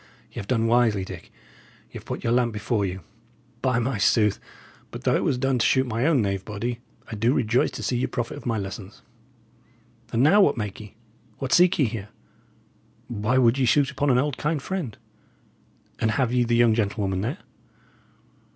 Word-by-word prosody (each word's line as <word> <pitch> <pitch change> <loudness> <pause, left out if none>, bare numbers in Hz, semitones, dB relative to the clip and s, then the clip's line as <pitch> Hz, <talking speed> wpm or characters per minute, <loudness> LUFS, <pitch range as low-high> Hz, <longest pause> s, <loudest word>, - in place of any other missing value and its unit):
y' - - -6
'ave 100 - -7
done 115 -3 +1
wisely, 115 -4 +2
Dick; 95 -2 -10 0.6
y' - - -6
'ave - - -11
put - - -5
your 115 - +1
lamp 120 -1 +2
before 105 0 -1
you. 95 0 -3 0.6
By 130 -3 +1
my 120 -2 -1
sooth, 105 0 +3 0.5
but, - - -9
though - - +2
it - - 0
was 130 - +1
done 135 0 0
to - - +2
shoot 130 0 +3
my 120 +3 -1
own 145 -8 +3
knave 100 -1 -2
body, 115 +4 -4 0.3
I - - -4
do 115 +6 +1
rejoice 120 +2 +2
to - - -7
see 125 - 0
ye 125 - 0
profit 120 -2 -4
of - - -8
my 115 -2 0
lessons! 100 +5 -7 1.1
And 115 +2 +2
now, 195 +8 +6
what 195 - +3
make 105 -3 -4
ye? 105 -1 -12 0.4
what 135 -2 -2
seek 180 +2 +5
ye 145 - +3
here? 110 -3 -5 1.0
Why 115 +2 0
would 125 +1 +4
ye 130 - +3
shoot 140 +2 +3
upon 140 +1 0
an 125 - +4
old, 140 +1 0
kind 150 +1 0
friend? 150 - -4 1.0
And 110 - +1
have 120 +2 0
ye 125 -1 +2
the 120 0 +1
young 120 -1 +4
gentlewoman 100 -3 -1
there?" 125 - -3
120 Hz, 195 wpm, -24 LUFS, 105-130 Hz, 1.1 s, now